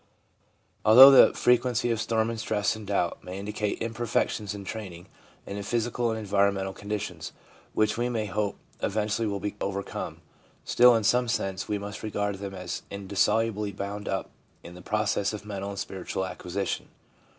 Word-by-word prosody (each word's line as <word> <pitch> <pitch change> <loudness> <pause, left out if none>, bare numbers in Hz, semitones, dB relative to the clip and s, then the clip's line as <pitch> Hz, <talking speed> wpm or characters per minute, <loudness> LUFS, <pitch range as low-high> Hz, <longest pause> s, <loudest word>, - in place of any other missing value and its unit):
Although 130 +6 +10
the 135 - +8
frequency 125 -1 +2
of 115 -1 0
storm 115 0 0
and 115 - -5
stress 110 -1 0
and 110 -2 -9
doubt 95 -4 -1
may 90 +1 -7
indicate 105 +1 -3
imperfections 115 -2 -1
in 100 -1 -8
training 95 -5 -7 0.4
and 100 - -5
in - - -5
physical 120 +2 -1
and 110 - -1
environmental 100 -2 +1
conditions, 105 +1 -5 0.4
which 110 +1 +1
we 120 +1 +1
may 115 -3 -1
hope 105 0 -2 0.2
eventually 110 +2 0
will 100 -1 -2
be 105 +1 -4
overcome, 100 0 -4 0.4
still 125 0 +6
in 110 - +1
some 120 +3 +3
sense 95 -4 -2
we 105 - -1
must 100 +1 -7
regard 105 -2 -2
them 100 -1 -6
as 90 -1 -5
indissolubly 100 +2 0
bound 100 +1 -5
up 95 - -2 0.3
in 85 - -10
the 90 - -11
pro 105 +4 -1
cess 100 +1 0
of 105 -1 -7
mental 100 -1 -5
and 100 - -6
spiritual 95 -1 -4
acquisition. 95 +1 -4
105 Hz, 170 wpm, -27 LUFS, 100-110 Hz, 0.4 s, Although